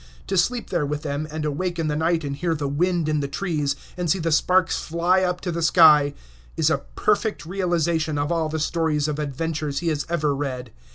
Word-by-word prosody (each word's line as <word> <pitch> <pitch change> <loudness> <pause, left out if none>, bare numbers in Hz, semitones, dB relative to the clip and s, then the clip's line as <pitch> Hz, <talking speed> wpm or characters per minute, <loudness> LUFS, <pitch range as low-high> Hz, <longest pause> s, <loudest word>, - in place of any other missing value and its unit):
To 195 - -2
sleep 235 +7 0
there 170 -4 +1
with 150 +1 -3
them, 145 +1 -3
and 155 0 -4
awake 175 +4 -2
in 165 -2 -1
the 150 - -1
night 165 +1 +1
and 140 -1 -3
hear 165 +3 -1
the 145 -2 -2
wind 170 +3 0
in 155 -1 +1
the 140 - -2
trees, 145 -2 -1 0.2
and 180 -2 -2
see 190 - +3
the 165 -2 -1
sparks 180 +3 +3
fly 175 +3 +1
up 180 -1 -1
to 180 - -3
the 170 0 -3
sky, 150 -3 +6 0.4
is - - +3
a - - +1 0.2
perfect - - 0
realization 170 -4 0
of 145 +3 -1
all 165 -2 0
the 160 - -2
stories 155 -1 0
of 150 0 -3
adventures 150 0 -3
he 170 +2 0
has 150 -2 -2
ever 150 -4 0
read. 130 -4 -4
160 Hz, 220 wpm, -23 LUFS, 150-170 Hz, 0.4 s, sky